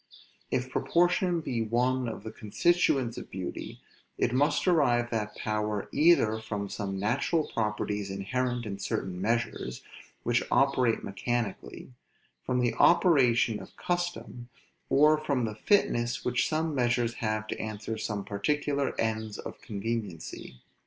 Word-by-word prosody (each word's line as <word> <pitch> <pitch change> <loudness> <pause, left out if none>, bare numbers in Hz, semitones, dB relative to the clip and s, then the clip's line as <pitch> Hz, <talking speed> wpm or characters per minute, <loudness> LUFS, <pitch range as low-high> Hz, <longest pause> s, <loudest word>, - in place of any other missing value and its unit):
If 125 +1 -1
proportion 175 +3 +2
be 120 -6 -2
one 125 +2 +1
of 110 - -7
the 110 - -6
constituents 125 - +1
of - - -10
beauty, 95 -1 -6 0.4
it 120 - +1
must 140 +3 +2
derive 125 -9 +3
that 105 -2 -2
power 105 -1 -2
either 145 -8 +4
from 105 -2 -4
some 95 -1 -4
natural 140 - +1
properties 105 -2 -1
inherent 120 +5 -2
in 100 -2 -5
certain 95 -2 -3
measures, 115 +3 -1 0.4
which - - +2
operate 130 -4 +2
mechanically; 100 - -3 0.5
from 125 0 0
the 120 -1 +1
operation 125 - +4
of - - -13
custom; 175 -8 -3 0.4
or 150 +2 +5
from 140 -5 0
the 110 - -3
fitness 120 - +1
which 125 0 +1
some 160 0 0
measures 120 -2 +1
have 110 -1 -1
to - - -4
answer 110 +1 -4
some 105 -2 -3
particular 140 +6 -1
ends 110 -2 -1
of - - -8
conveniency. 100 - -5
120 Hz, 130 wpm, -29 LUFS, 105-135 Hz, 0.5 s, or